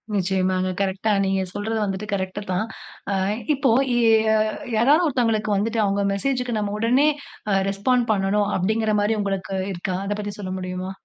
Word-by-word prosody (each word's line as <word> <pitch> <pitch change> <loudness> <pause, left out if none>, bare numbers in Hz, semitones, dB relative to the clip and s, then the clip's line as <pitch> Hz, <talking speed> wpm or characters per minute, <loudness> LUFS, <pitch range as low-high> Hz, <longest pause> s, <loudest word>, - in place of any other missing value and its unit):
நிச்சயமாங்க. 185 -1 +1
கரெக்ட்டா 195 +2 0
நீங்க 195 0 +1
சொல்றது 220 +2 -2
வந்துட்டு 195 0 -3
கரெக்ட்டு 190 +1 -2
தான். 185 +4 0 0.5
அ - - +1 0.4
இப்போ 270 -3 +2 0.2
ய் - - +3 0.3
ய - - +3 0.5
யாராவது 290 +10 +4
ஒருத்தவங்களுக்கு 225 -6 +1
வந்துட்டு 220 +3 0
அவுங்க 200 0 0
மெசேஜ்க்கு 250 +2 -1
நம்ம 205 -1 -2
உடனே 250 +6 +3 0.4
அ - - +3
ரெஸ்பாண்ட் 235 +5 +1
பண்ணணும், 200 +1 +1
அப்படிங்கற 215 +3 +1
மாரி 210 +2 +1
உங்களுக்கு 195 -1 -3 0.2
இருக்கா? 180 +1 -3
அதை 205 - -1
பத்தி 205 0 -5
சொல்ல 185 -2 -4
முடியுமா? 185 0 -4
205 Hz, 155 wpm, -23 LUFS, 190-225 Hz, 0.5 s, யாராவது